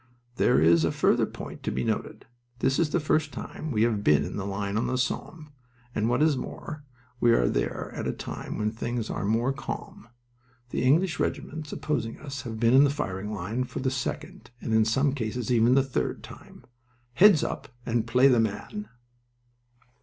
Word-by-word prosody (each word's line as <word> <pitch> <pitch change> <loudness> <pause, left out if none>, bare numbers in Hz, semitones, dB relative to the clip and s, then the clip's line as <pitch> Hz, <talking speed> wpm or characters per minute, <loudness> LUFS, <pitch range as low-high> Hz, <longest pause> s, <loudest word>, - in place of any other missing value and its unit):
There - - +4
is 80 +1 +5
a 80 - +2
further - - +2
point - - -9
to - - -2
be 65 - -2
noted: - - -3 0.3
this 135 +2 +1
is 165 -3 +2
the 175 - +1
first 155 -1 +1
time 155 - -6
we 110 -3 +2
have 110 -3 +1
been 75 -6 +4
in - - -6
the 100 -1 -3
line 100 0 -3
on 110 - 0
the 130 - -1
Somme, 150 +4 -3 0.4
and 110 +2 0
what 125 +5 +2
is 155 -2 +4
more, 150 +3 -6 0.4
we 120 - +4
are - - +3
there - - -2
at - - -4
a - - +1
time - - -6
when 105 0 0
things 115 0 -3
are - - -3
more 115 +5 +1
calm. 135 -3 -7 0.6
The - - -1
English 160 +7 +3
regiments 155 -1 -3
opposing 115 -7 -2
us 140 -2 -6
have 115 -4 -6
been 115 +1 +4
in 135 +2 +8
the 145 - +4
firing 105 -8 -3
line 105 +5 -2
for 125 - -8
the 130 0 0
second, 155 +8 -5
and 115 - -3
in 110 0 +4
some 135 +5 +2
cases 125 -1 -3
even 120 +1 +4
the 135 - +5
third, 135 -1 -2
time. - - -13 0.5
Heads 185 0 +6
up - - -4 0.2
and 115 -1 0
play 125 +3 +5
the 125 -3 +4
man!" 115 - -3
125 Hz, 195 wpm, -27 LUFS, 110-145 Hz, 0.6 s, in